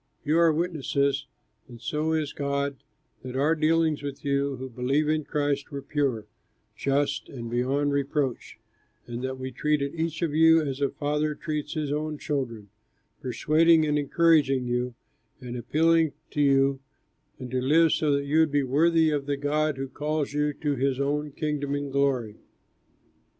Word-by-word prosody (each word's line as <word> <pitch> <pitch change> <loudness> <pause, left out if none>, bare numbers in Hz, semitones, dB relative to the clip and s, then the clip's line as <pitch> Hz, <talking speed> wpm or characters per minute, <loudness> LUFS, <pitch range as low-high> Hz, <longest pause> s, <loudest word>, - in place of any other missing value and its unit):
You 155 +3 +3
are 170 -1 +5
witnesses, 140 -4 0 0.4
and 120 -2 -12
so 150 +5 -2
is 155 -2 -1
God, 140 -1 -2 0.4
that 130 0 -7
our 145 +4 +3
dealings 160 -1 +2
with 140 0 -7
you 140 0 0
who 130 +1 -6
believe 130 +5 0
in 155 -1 0
Christ 145 -1 -1
were 140 -2 -6
pure, 135 -7 -1 0.5
just, 140 +1 -1
and 115 -3 -7
beyond 135 +4 0
reproach, 140 -2 -2 0.5
and 120 0 -6
that 130 0 -3
we 130 0 -5
treated 140 +2 0
each 165 0 -2
of 160 -3 -1
you 160 +1 +6
as 140 -3 -3
a 140 - +2
father 150 0 -1
treats 155 -2 -4
his 150 -2 -2
own 150 +1 -2
children, 120 -9 -4 0.5
persuading 155 +6 +3
and 150 -1 +1
encouraging 145 -3 +3
you, 125 0 -2 0.4
and 125 -2 -7
appealing 160 +6 +2 0.2
to 150 - -1
you 135 -1 +3 0.6
to 130 0 -3
live 160 +5 +4
so 150 -2 +1
that 140 0 +1
you 150 +3 +2
would 160 -2 +3
be 145 -1 +2
worthy 160 +4 +3
of 145 -2 -2
the 140 -1 -1
God 150 +1 0
who 135 0 -3
calls 150 +2 -2
you 150 0 +1
to 145 0 -2
his 135 0 0
own 145 +2 -1
Kingdom 145 -1 -2
and 145 -1 -4
glory. 135 -6 0
145 Hz, 165 wpm, -26 LUFS, 135-155 Hz, 0.6 s, you